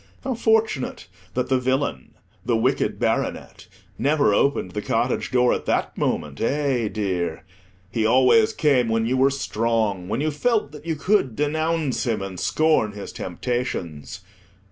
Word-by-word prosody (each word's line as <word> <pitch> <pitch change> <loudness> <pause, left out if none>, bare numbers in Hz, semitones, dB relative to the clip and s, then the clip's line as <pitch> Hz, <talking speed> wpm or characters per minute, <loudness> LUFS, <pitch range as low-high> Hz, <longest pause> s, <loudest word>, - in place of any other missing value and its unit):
How 265 -1 -1
fortunate 220 - 0 0.3
that 125 0 0
the 130 -1 +3
villain, 130 - -2 0.3
the 120 -2 +1
Wicked 110 - 0
Baronet, - - -2 0.3
never 145 -6 +3
opened 120 -6 +1
the 105 - -3
cottage 115 +4 -1
door 125 -1 +3
at - - -4
that - - 0
moment, 70 -2 -2
eh, 135 -3 0
dear! 90 -7 -2 0.5
He 115 - 0
always 130 - +5
came 140 - +2
when 115 0 +1
you 125 +3 0
were 135 +1 +4
strong, 110 -7 -1
when 115 - -1
you 155 +2 0
felt 210 - 0
that 150 +2 -11
you 165 - 0
could 155 - +1
denounce 155 0 0
him, 110 -4 0
and 95 -2 -6
scorn 155 -10 +2
his 100 -1 -7
temptations. 90 - -4
125 Hz, 150 wpm, -23 LUFS, 110-150 Hz, 0.5 s, always